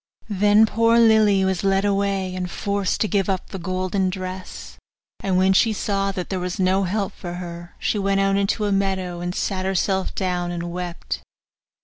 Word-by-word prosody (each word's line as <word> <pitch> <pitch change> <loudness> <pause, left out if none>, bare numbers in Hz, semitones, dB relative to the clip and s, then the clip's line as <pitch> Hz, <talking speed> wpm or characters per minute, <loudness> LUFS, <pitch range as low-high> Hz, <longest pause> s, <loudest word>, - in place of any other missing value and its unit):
Then 205 +2 +5
poor 230 +1 +3
Lily 215 -4 +5
was 190 -1 -1
led 195 0 +2
away, 195 -2 0
and 180 -1 -3
forced 200 +1 -1
to 215 - +2
give 200 -2 0
up 190 -1 -2
the 190 - -5
golden 185 +2 -1
dress; 185 0 -7 0.4
and 190 -2 0
when 190 +1 +4
she 220 +3 +4
saw 195 -1 -1
that 185 -1 -5
there 190 - -1
was 180 +1 -4
no 190 +1 +2
help 200 +2 -2
for 175 -2 -7
her, 175 -1 -8
she 210 - -1
went 195 0 +1
out 195 0 +2
into 200 +2 +1
a 205 - 0
meadow, 190 -3 -1
and 175 +1 -3
sat 190 -2 -1
herself 190 0 0
down 180 -2 -1
and 175 -1 -4
wept. 180 0 -5
190 Hz, 190 wpm, -22 LUFS, 185-200 Hz, 0.4 s, Then